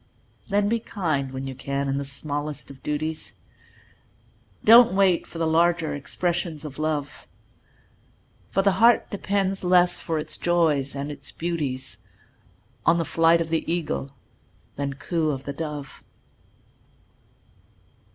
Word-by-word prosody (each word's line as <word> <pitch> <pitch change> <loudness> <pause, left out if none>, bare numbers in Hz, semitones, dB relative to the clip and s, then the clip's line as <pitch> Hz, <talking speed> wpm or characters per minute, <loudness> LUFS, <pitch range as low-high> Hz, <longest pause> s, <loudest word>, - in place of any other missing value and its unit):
Then 205 0 +2
be 230 +2 +1
kind 155 - -2
when 135 0 -5
you 135 - -5
can 140 +1 -3
in 135 0 0
the - - -2
smallest 145 +1 -5
of 135 -1 -14
duties, 155 +2 -3 1.3
Don't 230 -3 +8
wait 190 -3 +3
for - - -10
the 165 - 0
larger 165 -1 +2
expressions 165 +2 -3
of 145 -1 -8
Love; 150 -2 -3 1.2
For 195 - +1
the 200 - +4
heart 235 0 +5
depends 195 -1 -1
less 180 0 +4
for 165 -2 -2
its 155 - -4
joys 155 -6 +1
and 140 +2 -4
its 145 - -8
beauties 150 -6 -3 0.8
On 170 - +4
the 165 - 0
flight 165 +1 +4
of 165 -1 -4
the 165 - +1
Eagle 155 -5 -2 0.6
than 140 0 -2
coo 160 +2 -1
of 135 -2 -3
the 140 - -5
Dove. 150 -2 -6
160 Hz, 135 wpm, -25 LUFS, 140-175 Hz, 1.3 s, Don't